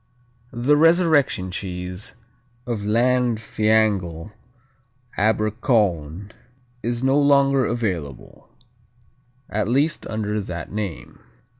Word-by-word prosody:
"The 125 +5 +2
'Resurrection 155 - +3
Cheese' 90 0 -6 0.5
of 120 -3 -3
Llanfihangel 110 -6 +1 0.8
Abercowyn 105 - 0 0.5
is 120 +1 -2
no 135 +2 +3
longer 140 -3 +3
available, 90 - -4 1.0
at 105 0 -2
least 145 +7 0
under 105 -1 -2
that 90 -3 -7
name. 100 -6 -6
110 Hz, 80 wpm, -22 LUFS, 95-125 Hz, 1.0 s, Resurrection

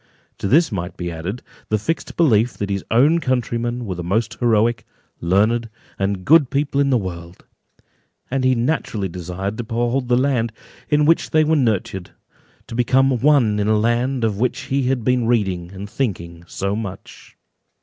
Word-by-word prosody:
To - - -2
this 155 - +4
might 90 -3 -4
be 90 -1 -4
added, 90 +8 -5 0.3
the 110 - +2
fixed 160 +11 -3
belief 120 -8 +3
that 100 -1 -4
his 100 -1 -2
own 145 +9 +4
countrymen 120 -3 -1
were 95 - -3
the 90 -1 -6
most 110 +6 0
heroic, 115 -1 +2 0.4
learned, 110 +7 +1 0.3
and 95 -1 -1
good 150 -3 +5
people 140 0 0
in 140 - +2
the 130 - +3
world; 85 -4 -7 0.9
and 135 0 0
he 130 0 +3
naturally 115 -5 -1
desired 90 +4 -5
to - - -1
behold 120 +3 -1
the 120 0 +3
land 125 -4 +1 0.4
in 150 0 +3
which 165 +2 +3
they 155 0 +3
were 160 +1 +2
nurtured, 105 - 0
and - - -34
to - - -9
become 130 +2 +2
one 125 -7 +3
in 105 - 0
a 110 0 +3
land 120 +3 0
of 105 -3 0
which 125 +1 0
he 135 -1 -1
had 130 -3 0
been 125 -1 +1
reading 95 -7 0
and 100 +1 -7
thinking 85 -8 -4
so 100 +3 -2
much. 100 -4 -8
115 Hz, 180 wpm, -20 LUFS, 100-130 Hz, 0.9 s, good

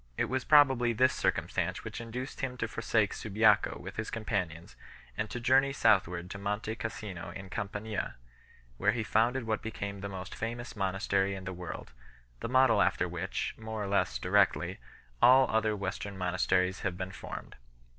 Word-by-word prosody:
It - - +2
was 130 0 -1
probably 130 -5 +5
this 130 +3 +4
circumstance - - -1
which - - -6
induced 125 +4 -6
him 130 -1 -3
to 115 - -1
forsake 110 -2 +1
Subiaco 105 -1 +3
with - - -8
his 110 - -3
com 115 -1 -5
panions, 85 -6 -2 0.4
and 105 - -2
to 125 - -4
journey 130 +3 +4
southward 90 -8 +2
to 100 - -6
Monte 105 +2 -2
Cassino 100 -7 -5
in 95 +2 -9
Campania, 105 -1 -3 0.6
where 105 +2 +3
he 115 -1 -1
founded 120 +4 +2
what 110 -1 -1
became 100 -2 -5
the 100 +1 -5
most 95 0 -7
famous 120 +2 -5
monastery 95 0 0
in 95 - -7
the 95 0 -5
world, 90 -7 -7 0.5
the - - -4
model 130 0 +5
after - - +2
which, - - -3
more 110 -1 -4
or - - -3
less 95 -11 +1
directly, 90 +1 +2 0.4
all 130 +1 +7
other 110 -1 +2
Western 100 0 -4
monasteries 90 0 +1
have 90 -2 -2
been 95 0 -4
formed. - - -8
105 Hz, 170 wpm, -31 LUFS, 95-115 Hz, 0.6 s, all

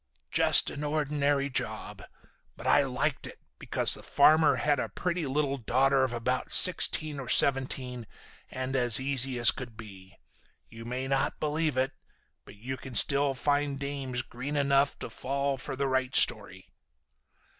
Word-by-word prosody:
"Just - - +2
an 145 - -7
ordinary 145 -2 -1
job. 135 - -4 0.6
But - - -11
I - - +4
liked - - -3
it - - -12 0.2
because - - 0
the - - +1
farmer 155 +2 +3
had 145 -2 0
a - - -3
pretty 175 -3 -3
little 140 0 -2
daughter 135 +3 +1
of 130 - -1
about 125 +2 -3
sixteen 155 -5 +4
or 130 -2 -8
seventeen 130 -3 +1 0.4
and 130 +1 -5
as 120 -3 +3
easy 135 -1 0
as 120 - +5
could 120 -4 -10
be. 95 -4 -13 0.5
You 115 0 -12
may 125 +2 -5
not 135 0 -1
believe 155 -2 -2
it, 130 +2 0 0.5
but - - -14
you 130 +6 -7
can 130 -2 -11
still 140 +4 +3
find 145 +1 -1
dames 135 -3 -4
green 130 +5 -7
enough 140 0 +1
to - - -8
fall 140 +1 -3
for 120 - -6
the 140 +1 -2
right 130 0 -2
story. 100 -5 +3
135 Hz, 155 wpm, -28 LUFS, 125-145 Hz, 0.6 s, as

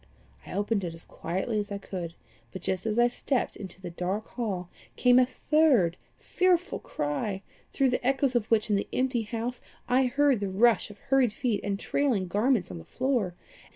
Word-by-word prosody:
I - - -7
opened 205 +1 0
it 170 -2 -4
as 165 - -12
quietly 190 +6 -2
as 205 0 -4
I 200 - -2
could, 175 -4 -6 0.4
but 185 - -8
just 190 +3 -1
as 215 0 -1
I 240 0 +6
stepped 245 +1 -1
into 190 -3 -9
the 180 -2 -7
dark 185 +5 -3
hall, 200 -7 -3 0.3
came 250 0 +5
a 250 - +4
third 260 - +3 0.2
fearful 365 0 +1
cry, 190 +7 -3 0.3
through 270 -2 +2
the 250 - -1
echoes 270 +1 +2
of 225 -3 +1
which 215 -1 +2
in 205 - +4
the 200 - -2
empty 255 -2 +1
house 230 +3 -4 0.3
I 255 +1 +3
heard 280 -1 +3
the 200 -1 -2
rush 220 +5 +3
of 205 - -12
hurried 265 -2 +2
feet 230 -4 -1
and 200 -1 -2
trailing 240 -10 0
garments 210 - +1
on 90 - -6
the 80 - -12
stair. 240 -10 -1
220 Hz, 190 wpm, -28 LUFS, 190-255 Hz, 0.4 s, I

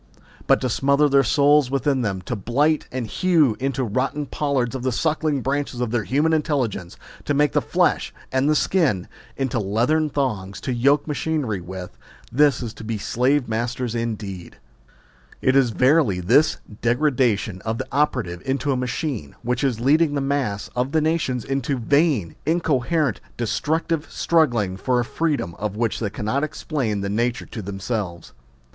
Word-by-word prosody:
But - - +5
to 130 - 0
smother 140 +4 +3
their 140 -1 +5
souls 145 +1 +4
within 135 0 +1
them, 95 -5 -2
to 120 - -3
blight 140 +9 +1
and 130 -2 -3
hew 150 - +2
into 135 0 -1
rotting 130 +6 -1
pollards 135 -4 -1
the 130 0 -1
suckling 155 +1 0
branches 140 -2 -2
of 120 -3 -1
their 115 -4 0
human 150 +5 +2
intelligence, 130 - -1 0.3
to 145 - 0
make 145 -1 +3
the - - +2
flesh - - +1 0.2
and 140 +4 +2
skin... 140 - +1 0.3
into 130 -3 -1
leathern 120 +10 +1
thongs 105 -10 -2
to 130 - -2
yoke 140 +4 +3
machinery 145 - -1
with, 90 +1 -8 0.3
this 140 -1 +3
is 115 -2 -5
to 115 - -11
be 110 0 -3
slave 125 +6 +1
masters 120 +1 -2
indeed.... 105 -6 -4 0.8
It 130 - +2
is 135 -3 +4
verily 125 - +3
this 115 - +3 0.2
degradation 120 -6 +1
of 110 +2 -2
the - - -3
operative 125 -12 0
into 140 +2 -1
a - - +1
machine, 125 - -3
which 125 +3 -1
is 125 -5 0
leading 145 +4 +3
the - - +1
mass 135 -7 -1
of 125 +4 -1
the 160 - +3
nations 155 -6 0
into 135 0 -1
vain, 135 - +1
incoherent, 155 -4 +1 0.2
destructive 155 +6 -1
struggling 120 - +1
for 125 +4 +1
a 120 - 0
freedom 150 - -1
of 105 -2 -3
which 115 0 -1
they 110 - -1
cannot 115 +7 -2
explain 135 -8 -2
the 100 - -2
nature 120 +4 -1
to 110 - -7
themselves. 95 -2 -4
130 Hz, 160 wpm, -22 LUFS, 110-145 Hz, 0.8 s, But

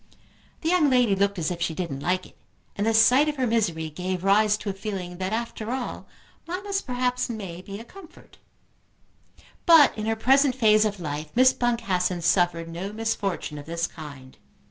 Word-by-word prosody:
The 320 - -1
young 345 -5 +3
lady 245 -6 +3
looked 200 +1 0
as 165 0 -1
if 170 -1 -5
she 165 -1 -1
didn't 160 -7 -4
like 180 +5 -1
it, - - -17 0.4
and 205 +2 -1
the 225 - +2
sight 255 +7 +5
of 300 - -3
her 260 -2 0
misery 175 -9 -1
gave 180 +3 -4
rise 210 +2 +3
to 210 -1 -4
a - - -7
feeling 190 -3 -6
that, 185 +1 -2
after 225 -1 -4
all, 255 0 -4 0.4
mammas 390 +3 -3
perhaps 250 0 -1
may 195 -7 -6
be 200 +2 -8
a - - -8
comfort. 350 +7 -16 1.3
But 325 -4 +7
in 215 0 -4
her 225 - +1
present 265 +3 +3
phase 215 -3 +4
of 205 -2 -2
life 150 -2 -5
Miss 255 +1 +6
Boncassen 185 -7 -1
suffered 170 -1 +2
no 175 +4 -6
misfortune 205 -8 -3
of 145 - -11
this 170 +1 -1
kind. 140 -6 -11
205 Hz, 185 wpm, -25 LUFS, 175-245 Hz, 1.3 s, But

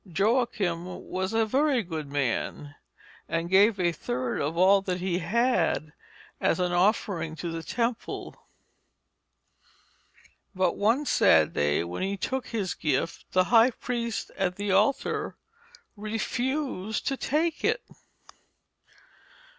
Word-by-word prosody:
Joachim 195 -4 -1
was 185 +1 -1
a 225 0 +2
very 265 +1 +2
good 160 -4 -5
man, 145 +1 -2 0.6
and 165 +2 -2
gave 200 +2 +5
a 175 -1 +2
third 125 -5 -3
of 155 +4 -2
all 195 +2 +5
that 185 -2 -3
he 180 -1 -1
had 175 -6 +1 0.5
as - - +1
an 180 -1 +1
offering 175 -3 +1
to 170 +1 -5
the 165 0 -4
temple; 230 +6 -3 2.2
but 185 -1 +1
one 230 +8 +2
sad 80 - +4
day 75 +2 +1
when 85 +1 -5
he 195 +1 -1
took 260 +5 -3
his 205 -6 -2
gift, 145 +1 -2
the 185 - +5
high 230 +2 +7
priest 235 -2 -4
at 180 -2 -1
the 205 0 -2
altar 210 +8 +1 0.6
refused 225 +1 -2
to 275 - 0
take 310 +4 -1
it. - - +1
190 Hz, 125 wpm, -27 LUFS, 170-230 Hz, 2.2 s, high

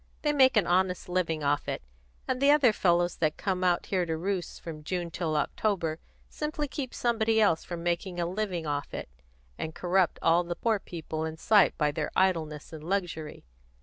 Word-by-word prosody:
They 295 -1 +2
make 260 -4 +5
an 210 - +4
honest 180 0 +1
living 165 -4 0
off 145 +1 +1
it, - - -3 0.4
and 255 0 -1
the 280 - +5
other 285 -6 +6
fellows 175 -2 +2
that 155 -2 0
come 185 -2 -1
out 175 -1 +2
to 190 - -1 0.2
roost 185 +1 -3
here - - -18
from 155 -2 -7
June 175 +1 -3
till 160 -3 -1
October 165 0 -1 0.3
simply 300 0 -3
keep 265 -2 -5
somebody 225 -2 +1
else 165 -7 +3
from 170 -1 -6
making 175 +1 -2
a 170 - +1
living 180 -2 -2
off 145 -1 -3
it, - - -6 0.5
and 160 0 -4
corrupt 180 0 +1
all 170 +2 +4
the 175 0 -4
poor 220 +2 +1
people 160 -3 -5
in 160 0 -4
sight 205 +2 +4
by 150 -1 +2
their 150 0 -2
idleness 165 -5 0
and 155 -1 -8
luxury. 170 - -3
175 Hz, 190 wpm, -28 LUFS, 160-205 Hz, 0.5 s, other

